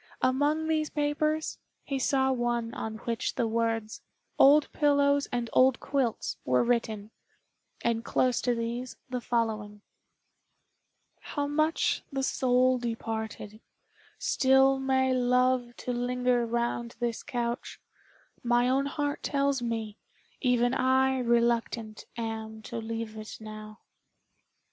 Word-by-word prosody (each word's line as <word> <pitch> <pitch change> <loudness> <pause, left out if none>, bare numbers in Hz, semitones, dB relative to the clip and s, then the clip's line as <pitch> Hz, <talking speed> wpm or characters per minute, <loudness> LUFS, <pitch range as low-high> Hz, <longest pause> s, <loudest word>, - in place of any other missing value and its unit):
Among 290 +5 +2
these 310 -1 0
papers 305 +1 -1 0.2
he 275 -1 -3
saw 265 0 +2
one 240 -2 -1
on 220 0 -4
which 230 -1 -2
the 230 - +1
words 225 -1 -1 0.4
"Old 290 +2 +6
pillows 285 -1 +3
and 240 -1 -1
old 260 0 +5
quilts" 265 -5 -1
were 125 0 +2
written, 225 -3 -1 0.7
and 230 -1 0
close 250 0 +1
to 245 -1 +1
these 235 +2 -4
the 250 -1 -2
following: 215 -3 -2 1.4
"How 290 -1 -3
much 310 +3 +1
the 270 -1 -2
soul 255 -1 +2
departed, 220 -2 -4 0.6
still 265 0 +3
May 265 -1 +2
love 250 -1 +2
to 250 - -3
linger 245 0 +1
round 235 0 -2
this 235 -2 -2
couch, 240 0 -4 0.6
My 240 0 +2
own 270 +2 +2
heart 290 +1 -2
tells 280 -2 0
me, 225 -3 -3 0.4
even 245 -1 +2
I 260 0 +2
Reluctant 235 -2 0
am 220 -1 -5
to 235 - -6
leave 225 -1 -4
it 215 0 -8
now." 215 0 -10
245 Hz, 120 wpm, -28 LUFS, 230-265 Hz, 1.4 s, Old